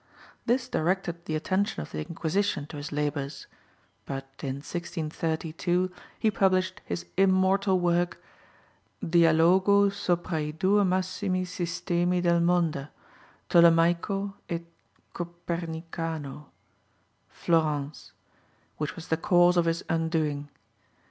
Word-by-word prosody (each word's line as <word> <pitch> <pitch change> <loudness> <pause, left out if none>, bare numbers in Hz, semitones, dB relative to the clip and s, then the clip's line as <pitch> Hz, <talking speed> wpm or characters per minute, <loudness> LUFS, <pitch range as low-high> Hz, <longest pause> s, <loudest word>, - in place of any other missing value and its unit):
This 250 +1 +2
directed 175 -3 -1
the 155 - -2
attention 190 +6 0
of - - -12
the - - -4
Inquisition 170 +1 -1
to 150 - -9
his 145 +1 -6
labours, 145 -1 -3 0.6
but 135 -1 -4 0.2
in 135 -2 -2
1632 165 +3 -2 0.3
he 220 - +2
published 185 -2 +1
his 85 0 -4
immortal 190 0 +3
work 175 0 +1 0.9
Dialogo 175 +5 +5
sopra 175 -4 -1
i 150 - -2
due 190 +7 +2
Massimi 185 0 0
Sistemi 175 0 -1
del 170 -1 +3
monda, 170 -5 +1 0.6
Tolemaico 170 +4 +4 0.2
et 170 0 -2 0.5
Copernicano 165 -3 -5 0.8
(Florence), 150 -3 -1 0.7
which 150 0 -3
was 170 - -10
the 160 - +2
cause 175 +1 +4
of 175 -1 +3
his 165 0 0
undoing. 160 -3 -1
170 Hz, 105 wpm, -27 LUFS, 160-185 Hz, 0.9 s, Dialogo